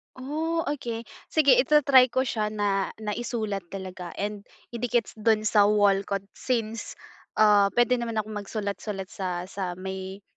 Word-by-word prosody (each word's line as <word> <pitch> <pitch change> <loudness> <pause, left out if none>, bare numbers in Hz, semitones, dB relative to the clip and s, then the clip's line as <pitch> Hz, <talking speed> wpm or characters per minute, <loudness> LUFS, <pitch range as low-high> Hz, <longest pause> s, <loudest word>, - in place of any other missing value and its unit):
Oh, 315 +5 -2
okey. 235 -6 -4 0.2
Sige 280 -5 +5
ita-try 270 -1 +6
ko 260 +1 0
siya 220 -4 -1
na 200 -2 0
na 210 -1 -2
isulat 215 -5 -3
talaga 185 -1 -7
and 205 0 -4 0.2
idikit 240 0 0
s - - -13
dun 215 0 +2
sa 210 -1 +4
wall 205 -2 +4
ko 200 - 0
since, 230 -3 -3 0.4
ah, 205 -2 +5
puwede 240 +1 +3
naman 230 -1 -3
akong 215 -1 -2
magsulat-sulat 200 -1 -4
sa 180 -4 -3
sa 185 -3 -4
may 190 +1 -6
215 Hz, 150 wpm, -26 LUFS, 200-240 Hz, 0.4 s, ita-try